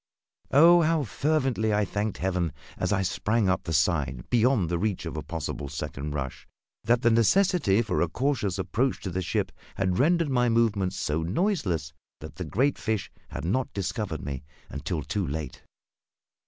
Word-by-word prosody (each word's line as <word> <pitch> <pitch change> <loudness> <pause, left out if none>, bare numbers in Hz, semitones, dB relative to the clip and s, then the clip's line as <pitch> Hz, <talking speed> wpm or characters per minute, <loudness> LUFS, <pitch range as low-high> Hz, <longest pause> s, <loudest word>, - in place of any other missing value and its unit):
Oh, 170 +5 +7
how 160 -1 +2
fervently 130 -3 0
I 105 0 +2
thanked 105 +1 -2
Heaven, 90 -5 -1 0.2
as 90 - -1
I 95 -2 +2
sprang 105 +3 +1
up 95 -1 0
the 85 - -3
side 70 -5 +1
beyond 120 -5 +3
the 85 0 -1
reach 95 -2 -1
of 80 - -5
a 75 - -3
possible 75 -4 -5
second 75 0 -5
rush, 65 -3 -5 0.4
that 120 +2 +2
the 120 - +5
necessity 115 - +3
for 105 -5 -1
a 85 - +3
cautious 125 - 0
approach 120 +7 0
to 95 - -4
the 95 +2 -2
ship 90 - -1 0.2
had 95 -2 0
rendered 165 +1 +3
my 125 -2 +3
movements 105 -5 +2
so 75 -2 -1
noiseless 90 - -1 0.3
that - - -10
the - - -4
great 135 +6 +1
fish 110 -3 -2 0.2
had - - -5
not 125 +9 0
discovered 95 -4 -3
me 70 -2 -4 0.3
until 75 +2 -3
too 95 +4 -2
late! 75 -2 -5
100 Hz, 170 wpm, -27 LUFS, 85-125 Hz, 0.4 s, Oh